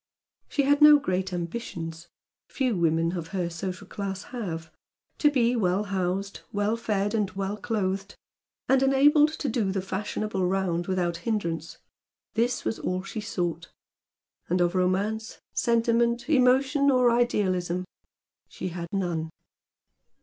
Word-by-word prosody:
She 285 - +1
had 285 +2 +3
no 300 0 +10
great 190 -7 -2
ambitions; 170 -2 -5 0.4
few 255 -5 0
women 165 -1 +2
of 170 -2 -4
her 175 -1 -2
social 185 +3 -5
class 195 0 -5
have. 165 -9 -5 0.5
To 295 - +5
be 250 -4 +2
well 195 -2 +1
housed, 195 0 -2
well 205 +2 0
fed 205 -2 -1
and 210 -4 +1
well 195 +1 -2
clothed, 195 -3 -2 0.5
and 265 0 +4
enabled 290 +3 +5
to 300 - -3
do 220 -5 0
the 195 - -1
fashionable 195 +1 -3
round 180 -2 0
without 175 -3 0
hindrance 170 -5 -3 0.6
this 240 +2 0
was 225 - -1
all 185 0 -2
she 215 +2 -5
sought, 175 -5 -3 0.8
and 180 +2 +2
of 175 0 +2
romance, 200 +4 0 0.2
sentiment, 235 +1 +2
emotion 275 0 +4
or 250 -3 +4
idealism 185 -7 +1 0.6
she - - -5
had 170 0 -5
none. 175 -5 -1
195 Hz, 135 wpm, -27 LUFS, 180-235 Hz, 0.8 s, no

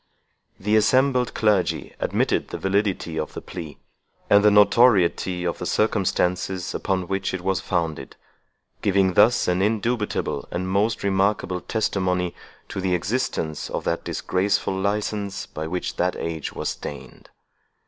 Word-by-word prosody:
The 105 +3 +1
assembled 130 +3 +3
clergy 105 -4 +1
admitted - - 0
the - - -5
validity 95 -4 -1
of - - -5
the - - -3
plea, 80 -6 -8 0.5
and 100 0 +7
the 105 - +7
notoriety 100 -4 +4
of 85 - -2
the - - -3
circumstances 95 -3 0
upon 95 -2 -1
which 95 -1 -2
it 95 - -5
was 95 -1 0
founded; 80 -7 -2 0.7
giving 95 -2 +2
thus 110 +6 +4
an 90 +1 +1
indubitable 110 +2 -1
and 90 +1 -3
most 100 +4 0
remarkable 95 -2 +1
testimony 90 -5 -1 0.4
to 95 - -4
the 90 -1 +1
existence 85 - -2
of - - -3
that - - -1
disgraceful 95 +1 0
license 100 0 -2
by 80 +1 -6
which 90 +2 -3
that 90 +1 +1
age 80 -2 -4
was - - -3
stained. 70 - -8
95 Hz, 140 wpm, -23 LUFS, 90-105 Hz, 0.7 s, and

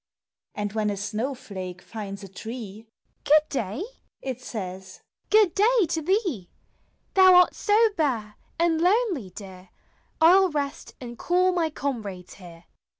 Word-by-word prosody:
And 205 -1 -3
when 215 -1 0
a 200 - -3
snow 220 +7 -3
flake 185 -6 -8
finds 200 -1 -8
a - - -8
tree, 220 +2 -8 0.4
"Good 300 +1 +5
day!" 230 - -3 0.4
it 255 -2 -5
says 190 -5 -7
— - - -50
"Good 420 -5 +4
day 440 +1 +3
to 325 -1 -1
thee! 345 - -1 0.6
Thou 375 -1 +7
art 360 0 +6
so 415 0 +1 0.2
bare, 240 - -1 0.2
and 330 -1 +1
lonely, 365 - +1
dear, 185 -1 -12 0.5
I 325 +1 +7
'11 380 -2 +3
rest 285 -2 -4
and 240 -2 -9
call 365 +1 +2
my 340 -3 0
comrades 215 - -5
here." 170 -3 -14
250 Hz, 150 wpm, -25 LUFS, -, 0.6 s, Thou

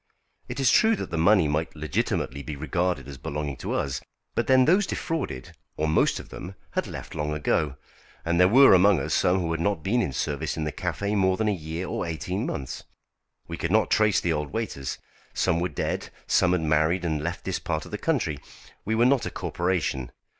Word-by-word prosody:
It - - -5
is 130 -2 +4
true 225 0 +5
that - - -6
the 85 - -2
money 90 -1 +5
might 75 +3 -1
legitimately 75 -2 -2
be 75 +1 -6
regarded 80 0 -1
as 70 -2 -9
belonging 75 -1 -4
to - - -4
us. 65 -2 -1 0.3
But - - -1
then 130 -1 +6
those 185 +6 +4
defrauded, 140 - -4 0.2
or 80 - 0
most 80 - +2
of - - -11
them, 90 +2 -8 0.2
had - - -1
left - - -8
long 75 0 -2
ago, 75 -1 0 0.5
and 85 +1 +1
there 90 - +7
were 130 +5 +7
among 95 -1 +5
us 70 - -2
some 90 +1 +3
who 85 -2 -1
had 80 0 -1
not 85 -3 0
been 120 +7 +2
in 70 - -1
service 70 +2 -2
in 80 - -1
the 75 - -2
café 100 +6 -2
more 95 -2 +2
than 110 - 0
a - - +2
year 80 0 -5
or - - -2
eighteen 90 - -3
months. 65 -2 -5 0.6
We 85 - -5
could 85 - -2
not 110 +1 +3
trace 105 -3 +4
the 85 - 0
old 75 -1 -3
waiters. 110 - -3 0.4
Some 85 - +2
were 90 +1 0
dead, - - -3 0.2
some 90 -1 +3
had 90 - +1
married 80 +3 +2
and 80 -3 -1
left 85 +3 -4
this - - -1
part - - -3
of - - -12
the - - -4
country. - - 0 0.4
We 110 +2 -1
were 115 +2 +4
not 130 -1 +3
a - - -2
corporation. 85 -8 -2
85 Hz, 215 wpm, -26 LUFS, 75-100 Hz, 0.6 s, there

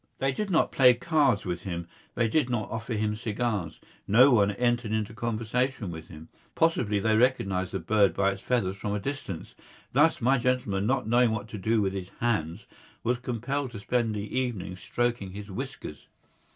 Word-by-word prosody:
They 135 0 +1
did 205 +9 -3
not 165 -4 +2
play 125 -2 +6
cards 145 -6 +2
with 90 -1 -3
him, 85 -3 -5 0.3
they 115 - +2
did 135 +2 +1
not 120 -3 -2
offer 115 +1 -3
him 105 0 0
cigars. 110 -6 -2 0.3
No 125 +7 +7
one 105 -4 +4
entered 120 +1 0
into 110 -1 -1
conversation 115 -1 -2
with 80 -1 -8
him. 80 -1 -11 0.3
Possibly 120 -11 +2
they 110 +2 +2
recognised 100 -7 +1
the - - -2
bird 100 -5 +2
by 100 0 +2
its 95 0 -7
feathers 100 -7 0
from 105 +1 -3
a - - -1
distance. 100 - -5 0.4
Thus, 150 +5 +4
my 130 +2 +3
gentleman, 115 -5 0
not 135 -2 0
knowing 120 +1 +4
what 110 -1 -3
to 105 - -6
do 110 +2 +2
with 95 -1 -1
his 95 -1 -5
hands, 105 -6 -1 0.4
was 120 +1 0
compelled 125 +3 -3
to 105 - -6
spend 115 +1 0
the 105 0 -5
evening 120 -8 -2
stroking 120 -1 -2
his 100 0 -8
whiskers. 125 - -7
110 Hz, 185 wpm, -28 LUFS, 100-125 Hz, 0.4 s, No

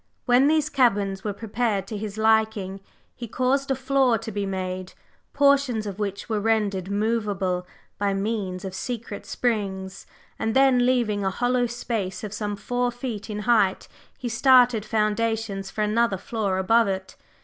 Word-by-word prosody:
When 250 +3 +5
these 310 -1 +3
caverns 205 -9 +1
were 210 - -1
prepared 215 -1 -2
to 215 - -6
his 210 0 -5
liking, 220 -3 +1 0.3
he 240 - -7
caused 260 +4 0
a 270 - +2
floor 260 -2 +2
to 225 0 -7
be 200 -1 -2
made, 185 -1 -4 0.4
portions 280 -6 +3
of 200 -1 -6
which 200 -1 -3
were 220 -2 -1
rendered 205 -4 0
movable 200 -4 -1 0.3
by 200 -1 +1
means 195 -2 -2
of 190 - -5
secret 225 0 -5
springs, 195 -5 -2 0.3
and 225 0 -1
then 260 -2 +5
leaving 225 -5 +1
a 190 - +1
hollow 245 +4 +1
space 230 -5 -4
of 210 -1 -5
some 205 -1 -3
four 245 +4 -1
feet 240 -3 -6
in 210 0 -4
height, 215 -4 +2 0.3
he 250 - -5
started 245 -2 +4
foundations 215 -2 -1
for 215 - -2
another 215 -1 +1
floor 200 -1 -2
above 225 +4 +3
it. 190 -1 -4
215 Hz, 160 wpm, -24 LUFS, 195-245 Hz, 0.4 s, When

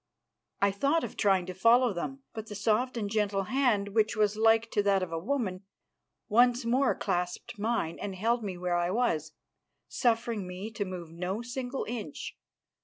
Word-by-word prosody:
I 200 - +5
thought 280 +11 +1
of - - -5
trying 195 -3 +2
to 185 - -6
follow 230 +4 +4
them, 270 +10 -5
but 220 0 -6
the 210 - -7
soft 225 +5 +1
and 210 -3 -1
gentle 200 -2 0
hand, 230 -3 +1
which 215 +2 +1
was 210 -1 +2
like 225 +1 +3
to 205 - +2
that 200 -2 +2
of 175 - -5
a 165 - -2
woman, 200 -3 -2 0.7
once 240 +2 +4
more 255 +3 +2
clasped 180 +3 -3
mine 215 -7 -1
and 200 -1 -4
held 230 +5 0
me 190 -3 -4
where 175 0 0
I 175 0 +1
was, 165 -8 0 0.5
suffering 230 -4 0
me 185 +4 -6
to 210 -2 -3
move 180 -3 -7
no 180 +6 -3
single 245 +2 -4
inch. 215 -10 -5
210 Hz, 180 wpm, -29 LUFS, 185-235 Hz, 0.7 s, I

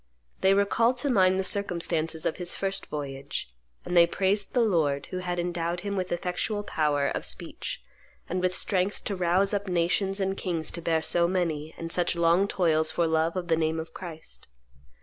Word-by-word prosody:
They 190 +1 +4
recalled 230 +5 +2
to 270 +2 0
mind 190 -4 +4
the - - +1
circumstances 170 -4 0
of - - 0
his 175 -1 -2
first 195 0 -3
voyage; 140 -2 -5 0.4
and 180 - -3
they 170 -1 +7
praised 195 +4 0
the 245 - +4
Lord 155 -9 +1
who 185 - -3
had 180 -1 -3
endowed 175 0 -2
him 200 +1 -3
with 185 -1 -2
effectual 180 +4 -2
power 150 -6 +1
of - - -3
speech - - -4 0.5
and 180 +1 -2
with 185 0 0
strength 195 0 0
to 200 - -2
rouse 185 +3 +2
up 205 0 -1
nations 185 +3 +1
and 195 0 0
kings 170 -5 -1
to 170 - -6
bear 160 -1 +1
so 170 +1 +4
many 160 -4 -2
and 165 0 -5
such 175 0 +3
long 170 +3 +3
toils 160 -5 +2
for 170 +2 +1
love 160 +1 +1
of 180 -2 -3
the 165 - +3
name 160 0 0
of 160 - -7
Christ. 165 -4 -8
175 Hz, 190 wpm, -27 LUFS, 165-195 Hz, 0.5 s, they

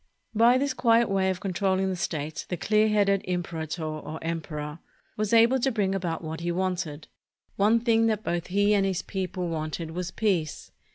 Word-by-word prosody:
By 235 +3 +5
this 280 0 0
quiet 230 -3 +3
way 190 -1 +2
of 185 -1 -2
controlling 190 0 0
the - - -2
state, 155 -4 -4
the 180 - -2
clear 215 +5 +3
headed 200 -2 +3
imperator, 170 -2 -3
or 155 0 -5
emperor, 155 -2 -4 0.4
was 215 -1 -2
able 235 +3 +5
to 265 +2 +1
bring 200 -4 0
about 175 -4 -2
what 160 +1 -5
he 170 +1 -2
wanted. 175 -4 -2 0.5
One 215 +3 +4
thing 225 -1 +3
that 215 -1 0
both 170 0 -2
he 205 +2 +2
and 200 -1 +3
his 190 -2 -1
people 185 -2 -3
wanted 160 0 -4
was 180 +1 -4
peace. 185 -8 -1
190 Hz, 180 wpm, -27 LUFS, 165-210 Hz, 0.5 s, By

